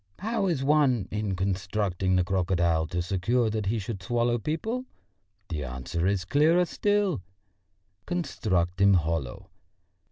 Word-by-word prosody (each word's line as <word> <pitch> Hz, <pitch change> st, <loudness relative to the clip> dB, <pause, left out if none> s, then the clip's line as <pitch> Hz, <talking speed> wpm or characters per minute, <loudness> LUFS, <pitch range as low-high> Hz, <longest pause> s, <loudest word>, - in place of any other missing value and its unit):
How 220 Hz, 0 st, -1 dB
is 155 Hz, -7 st, 0 dB
one, 135 Hz, -8 st, +3 dB
in 105 Hz, -2 st, -2 dB
constructing 95 Hz, 0 st, -1 dB
the 90 Hz, -, +3 dB
crocodile, 85 Hz, -3 st, +1 dB
to 90 Hz, +1 st, -2 dB
secure 110 Hz, +6 st, +1 dB
that 105 Hz, -2 st, -2 dB
he 115 Hz, +3 st, +1 dB
should 100 Hz, -1 st, -5 dB
swallow 120 Hz, +4 st, +1 dB
people? 220 Hz, -, -3 dB, 0.6 s
The 75 Hz, -3 st, -3 dB
answer 65 Hz, +8 st, -3 dB
is 95 Hz, -3 st, 0 dB
clearer 160 Hz, -, +4 dB
still: 205 Hz, -, 0 dB, 0.9 s
construct 95 Hz, -, -1 dB
him 100 Hz, 0 st, +6 dB
hollow. 80 Hz, -6 st, -2 dB
100 Hz, 130 wpm, -27 LUFS, 90-140 Hz, 0.9 s, him